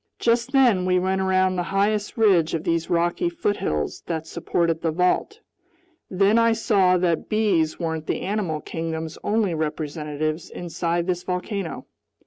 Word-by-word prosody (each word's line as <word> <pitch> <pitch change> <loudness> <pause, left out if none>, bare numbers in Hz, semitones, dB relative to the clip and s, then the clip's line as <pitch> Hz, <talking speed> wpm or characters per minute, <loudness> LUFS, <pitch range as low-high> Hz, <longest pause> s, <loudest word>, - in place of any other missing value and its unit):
Just 235 +2 +1
then 245 -9 +4
we 180 0 +3
went 190 +1 0
around 185 0 +2
the - - +1
highest 205 +3 0
ridge 185 -8 +3
of 160 - -3
these 165 -2 -1
rocky 175 - +1
foothills 205 - -2
that 160 -2 -3
supported 165 0 -1
the 165 - 0
vault. 180 - 0 0.7
Then 200 +4 +3
I 230 0 +4
saw 200 -5 +3
that 175 -2 0
bees 195 -8 +1
weren't 160 -2 -3
the - - -1
animal 185 -6 -2
kingdom's 160 -1 -5
only 210 -4 +1
representatives 155 0 -3
inside 170 0 -2
this 180 -1 -1
volcano. 180 0 -4
180 Hz, 145 wpm, -23 LUFS, 165-205 Hz, 0.7 s, then